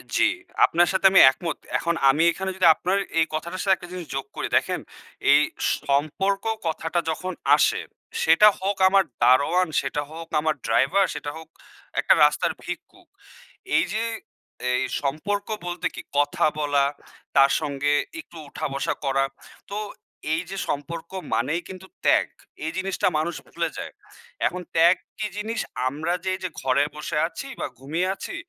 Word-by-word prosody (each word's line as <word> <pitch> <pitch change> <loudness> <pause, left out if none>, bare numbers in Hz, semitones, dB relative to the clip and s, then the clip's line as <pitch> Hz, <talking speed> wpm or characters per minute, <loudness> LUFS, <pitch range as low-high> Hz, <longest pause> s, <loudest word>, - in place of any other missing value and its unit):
জি। 345 - +4 0.4
আপনার 175 +1 +3
সাথে 190 +1 0
আমি 190 - +7
একমত 160 +4 -5 0.2
এখন 170 0 -1
আমি 150 +4 +3
এখানে 190 +2 -4
যদি 185 -2 +4
আপনার 185 +2 0 0.2
এই 160 - +4
কথাটার 170 +4 -3
সাথে 195 -1 +4
একটা 175 -1 -12
জিনিস 180 -3 -6
যোগ 135 - -2
করি, - - -2
দেখেন - - -1 0.5
এই - - +7 0.4
সম্পর্ক 155 +8 0 0.2
কথাটা 160 +1 -1
যখন 185 +3 -3 0.2
আসে - - +2 0.4
সেটা 210 - +7
হোক 195 +1 -1
আমার 195 0 +5 0.2
দারোয়ান, 140 +9 +4
সেটা 140 +2 -2
হোক 165 +1 -8
আমার 155 0 +1
ড্রাইভার, 135 +12 +3
সেটা 145 0 -4
হোক 160 - -11 0.5
একটা - - +5
রাস্তার - - +3
ভিক্ষুক। - - -8 0.7
এই 325 - +5
যে 220 +2 0 0.7
এই 125 - +1 0.2
সম্পর্ক 180 +9 -2 0.2
বলতে 175 0 -2
কি - - -6 0.2
কথা 145 0 +2
বলা, 145 -2 +2 0.5
তার 135 0 +6
সঙ্গে 145 -1 -1 0.3
একটু 175 - -11
উঠা - - -5
বসা 140 - -1
করা, 135 0 +2 0.5
তো 200 - -4 0.6
এই 160 - +1
যে 195 - -5
সম্পর্ক 165 +4 -4 0.2
মানেই 145 +8 0
কিন্তু 190 0 -9 0.2
ত্যাগ। - - +4 0.4
এই 160 - -1
জিনিসটা 190 0 0
মানুষ 160 +2 -1
ভুলে - - -2
যায়। - - -6 0.5
এখন 180 - -4
ত্যাগ 170 +3 +6 0.2
কি 215 - -1
জিনিস? 220 +2 -3 0.3
আমরা 155 +6 -2
যে - - +1
এইযে 185 -1 -4
ঘরে 135 +2 +2
বসে 150 0 -4
আছি 275 +10 -8
বা - - -2
ঘুমিয়ে 160 +7 -1
আছি - - -7
165 Hz, 160 wpm, -24 LUFS, 145-190 Hz, 0.7 s, আমি